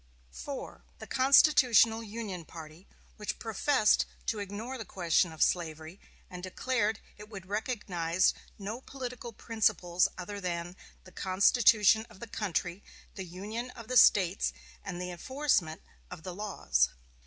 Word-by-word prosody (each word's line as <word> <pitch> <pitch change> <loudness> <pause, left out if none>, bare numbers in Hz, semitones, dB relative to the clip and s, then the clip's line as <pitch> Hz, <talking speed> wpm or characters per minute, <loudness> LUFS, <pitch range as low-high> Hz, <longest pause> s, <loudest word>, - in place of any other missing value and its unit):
4. 65 -1 -7
The - - -9
Constitutional 255 -4 +5
Union 210 -5 -6
party, 160 +2 -12 0.3
which 210 - -4
professed 225 +1 +2 0.2
to 220 - -1
ignore 205 +6 -5
the - - -4
question 175 -3 +1
of 160 - +1
slavery, 160 +1 -2 0.3
and 180 -1 -9
declared 220 +3 -1 0.2
it 210 0 -11
would 195 -4 -9
recognize 185 -5 0 0.2
no 215 +5 -6
political 250 -3 -7
principles 200 -6 +1
other 200 +2 -6
than 175 -1 -4 0.3
"the 185 - -15
Constitution 215 +3 +4
of - - -16
the - - -6
country, 185 -4 -3 0.3
the 190 - -6
union 210 +8 -6
of 230 -1 -10
the 255 - -2
States, 195 -5 +5 0.3
and 180 -3 -5
the 180 0 -4
enforcement 185 - -1 0.3
of 175 -3 -10
the 185 - -6
laws." 65 - 0
200 Hz, 135 wpm, -30 LUFS, 175-225 Hz, 0.3 s, Constitutional